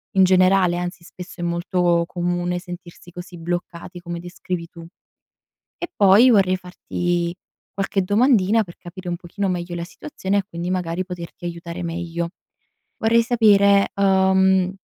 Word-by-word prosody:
in 190 - +6
generale, 185 -1 +4
anzi 175 0 -5
spesso 180 0 -10
è - - -2
molto 170 0 +1
comune 175 0 -2
sentirsi 175 -1 -10
così 175 0 -9
bloccati, 175 +1 -5
come 170 -1 -6
descrivi 175 -1 -5
tu. 170 0 -12 0.9
E 345 - -6
poi 205 +5 +6
vorrei 190 -3 +4
farti 175 -1 -3 0.4
qualche 195 0 -1
domandina 215 +1 +3
per 170 -3 -14
capire 180 0 -9
un 175 - -2
pochino 190 +2 -3
meglio 175 -1 -3
la 170 - -4
situazione 200 - -3
e 195 - +1
quindi 170 0 -5
magari 180 0 -2
poterti 175 -1 -9
aiutare 170 +1 -6
meglio 170 0 -3 0.7
vorrei 230 +1 +3
sapere, 200 -4 +4
uhm 190 -1 +3
180 Hz, 140 wpm, -22 LUFS, 175-190 Hz, 0.9 s, in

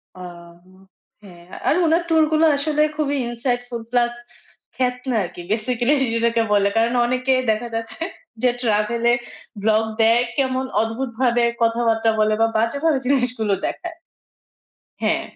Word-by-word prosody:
আহ 170 -1 -11 0.7
হ্যাঁ, 175 -3 -14 0.2
আর - - +4
ওনার 325 +2 +3
tour 320 -1 +4
গুলা 315 +1 +4
আসলে 300 +1 +1
খুবই 285 -2 0
insightful 245 0 -3
plus 240 -1 +2 0.6
ক্ষেত 250 -1 0 0.2
না 240 - 0
আরকি 175 - -9
basically 240 +4 +1 0.2
যেটাকে 230 0 +1
বলে। 200 -1 +3
কারণ 230 +2 +2
অনেকের 255 +1 +1
দেখা 225 +3 -2
যাচ্ছে 225 +6 -5 0.4
যে 250 - +4
travel 230 0 0
এর 240 - +3 0.4
vlog 215 +1 +3 0.2
দেয়, 230 +2 +5 0.2
কেমন 260 -1 0 0.2
অদ্ভুতভাবে 235 +1 0 0.2
কথাবার্তা 230 -1 +2
বলে 215 0 +3
বা 225 - +5
বাজেভাবে 280 +7 +1
জিনিসগুলো 250 -6 +1
দেখায়। 345 -2 -6 1.1
হ্যাঁ। - - +1
240 Hz, 135 wpm, -21 LUFS, 225-260 Hz, 1.1 s, দেয়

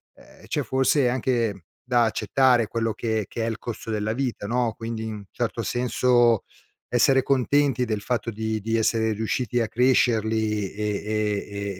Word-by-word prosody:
ehm, - - -18
c'è - - -1
forse 130 0 +2
anche 115 -7 -1 0.2
da 120 -1 +2
accettare 120 +1 +2
quello 115 0 -1
che 110 -1 -2
che 115 - -3
è - - 0
il 115 - -4
costo 115 -1 -6
della 105 0 -1
vita 125 -4 -3
no, 120 0 0
quindi 115 -1 -5
in 105 -2 -6
certo - - -2
senso, 120 -2 +2 0.5
essere 130 +2 +4
contenti 135 -1 +2
del 110 -3 -2
fatto 120 +1 -2
di 110 0 -2
di 115 +2 -1
essere 110 0 +1
riusciti 115 +2 -1
a 115 - 0
crescerli 110 -4 +1
e 105 -1 -2
115 Hz, 155 wpm, -24 LUFS, 110-125 Hz, 0.5 s, essere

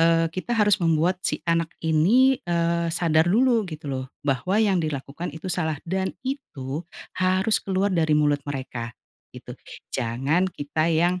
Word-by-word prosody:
eee, 165 0 +4
kita 185 +5 -5
harus 210 -3 +3
membuat 170 +3 +2
si 150 - -1
anak 165 -1 +1 0.2
ini, 225 +13 +4
eee, 170 0 0
sadar 160 -1 +2
dulu 235 +2 +3
gitu 155 -1 -8
loh 130 0 -3 0.2
bahwa 140 +8 0
yang 200 -5 +3
dilakukan 150 +2 -4
itu 160 - -8
salah 160 -4 -1
dan 190 +2 -1 0.2
itu 155 - -4 0.3
harus 185 +3 +2
keluar 195 +1 0
dari 160 -3 +2
mulut 145 -1 +2
mereka, 130 -4 -5 0.5
gitu - - -9 0.4
jangan 135 +9 0
kita 155 0 -1
yang, 175 +3 +2
165 Hz, 150 wpm, -24 LUFS, 150-185 Hz, 0.5 s, eee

